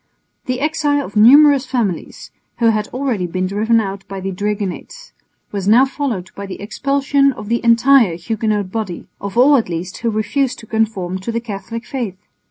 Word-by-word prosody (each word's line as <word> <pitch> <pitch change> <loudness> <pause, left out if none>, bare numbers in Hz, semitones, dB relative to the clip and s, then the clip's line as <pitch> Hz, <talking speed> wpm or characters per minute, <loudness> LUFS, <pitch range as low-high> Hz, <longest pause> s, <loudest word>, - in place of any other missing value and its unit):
The 255 0 -2
exile 295 -2 0
of 205 - -11
numerous 275 +5 +6
families, 235 -9 -3 0.3
who 230 -1 +3
had 215 -1 0
already 250 -8 -2
been 185 +2 -2
driven 215 +4 +2
out 195 -2 -4
by 195 0 -6
the 195 +1 -4
dragonnades, 205 - -4 0.4
was 200 -2 -3
now 235 +5 +6
followed 255 -10 -4
by 200 0 -7
the 190 - -7
expulsion 275 +5 +1
of 210 -3 -9
the 235 0 0
entire 235 -4 +4
Huguenot 210 +1 -2
body, 210 -6 -4 0.2
of 200 +2 -5
all 275 +3 +6
at 225 - -1
least 175 +2 -5
who 230 - -1
refused 240 +5 -1
to - - -11
conform 210 -5 -1
to 210 +5 -4
the 230 - -1
Catholic 230 +1 -7
faith. 235 -9 -4
220 Hz, 180 wpm, -18 LUFS, 195-255 Hz, 0.4 s, numerous